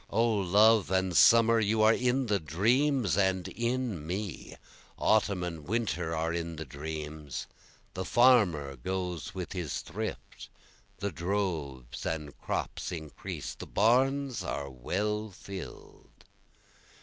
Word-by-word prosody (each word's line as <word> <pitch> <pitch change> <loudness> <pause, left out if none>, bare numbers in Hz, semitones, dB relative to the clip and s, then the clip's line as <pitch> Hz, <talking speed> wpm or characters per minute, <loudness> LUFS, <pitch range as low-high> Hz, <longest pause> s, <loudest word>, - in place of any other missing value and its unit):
O 115 +3 +2
love 105 +2 +4
and 95 -1 +1
summer, 115 +2 +6
you 110 0 +2
are 110 +1 +7
in 125 +2 +1
the 105 -3 +1
dreams 115 - +2
and 95 -2 +1
in 115 -8 -2
me, 95 0 -5 0.4
Autumn 100 -4 +2
and 80 -4 -5
winter 85 -7 -1
are 80 +1 -1
in 85 -1 -3
the 80 +1 -6
dreams, 75 -1 -6 0.5
the 95 - -3
farmer 95 - +4
goes 90 +4 -4
with 90 -2 -5
his 85 -6 -3
thrift, - - -6 0.5
The 100 0 -3
droves 80 -8 -3
and 75 -3 -4
crops - - -3
increase, 80 -4 -6
the - - -9
barns 130 +3 +2
are 70 -1 -4
well 105 - -2
fill'd. 95 -1 -11
95 Hz, 125 wpm, -30 LUFS, 80-110 Hz, 0.5 s, are